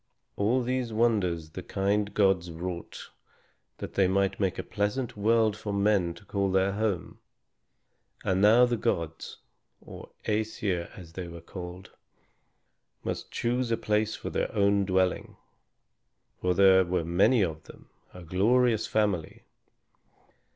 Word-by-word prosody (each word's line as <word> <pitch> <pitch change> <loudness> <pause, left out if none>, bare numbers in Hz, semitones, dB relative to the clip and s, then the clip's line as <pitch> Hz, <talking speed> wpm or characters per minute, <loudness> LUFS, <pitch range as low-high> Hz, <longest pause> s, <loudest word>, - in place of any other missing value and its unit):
All 120 +5 +1
these 125 -1 -2
wonders 100 -8 0
the - - -6
kind 100 +1 -1
gods 95 -4 +2
wrought 85 +1 -7 0.7
that - - -7
they 95 -2 +3
might 100 +1 +1
make 95 -4 0
a - - -3
pleasant 115 +4 -2
world 110 0 +2
for 105 0 -5
men 100 -4 +1
to 100 - -16
call 100 0 -1
their 95 +1 +2
home. 100 -3 -2 1.0
And 95 0 +1
now 115 +4 +7
the 120 -1 -1
gods, 85 -8 -3 0.4
or - - -11 0.2
Æsir 105 -5 -1
as 85 -3 -12
they 90 0 -6
were 85 0 -9
called, 90 +2 -9 1.1
must - - -4
choose 125 +1 -1
a 115 - +1
place 105 0 0
for - - -6
their - - -1
own 100 -1 +3
dwelling, 95 -1 0 1.0
for 90 0 0
there 95 -1 +6
were 90 -2 -1
many 95 +7 +3
of 80 -3 -4
them, - - -15 0.2
a 90 - -11
glorious 110 +6 +2
family. 100 -7 -1
100 Hz, 135 wpm, -28 LUFS, 90-110 Hz, 1.1 s, now